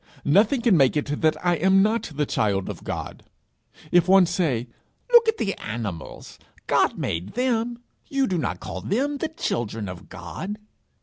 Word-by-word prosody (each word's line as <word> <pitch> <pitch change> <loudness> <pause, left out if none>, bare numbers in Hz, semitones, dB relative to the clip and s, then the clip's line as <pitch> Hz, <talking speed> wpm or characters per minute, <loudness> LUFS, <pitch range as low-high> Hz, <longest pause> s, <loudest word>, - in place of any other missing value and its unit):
nothing 210 - +4
can 230 -5 +4
make 135 -2 +4
it 145 0 -2
that 155 -1 +3
I 175 -1 +3
am 190 +3 +4
not 220 -3 0
the 150 +1 0
child 100 -7 0
of - - -7
God. - - -6 0.7
If 175 0 +4
one 190 0 +7
say, 160 -9 -1 0.5
"Look 470 -1 +8
at 445 0 +2
the 195 - -1
animals: 105 -7 -6 0.3
God - - +2
made 85 - -3
them: 240 -1 -1 0.2
you 275 -1 +1
do 185 -6 -1
not - - -2
call - - -6
them 280 +8 -1
the 320 - -2
children 115 - -3
of 90 -2 -9
God!" 205 +2 -6
180 Hz, 170 wpm, -24 LUFS, -, 0.7 s, Look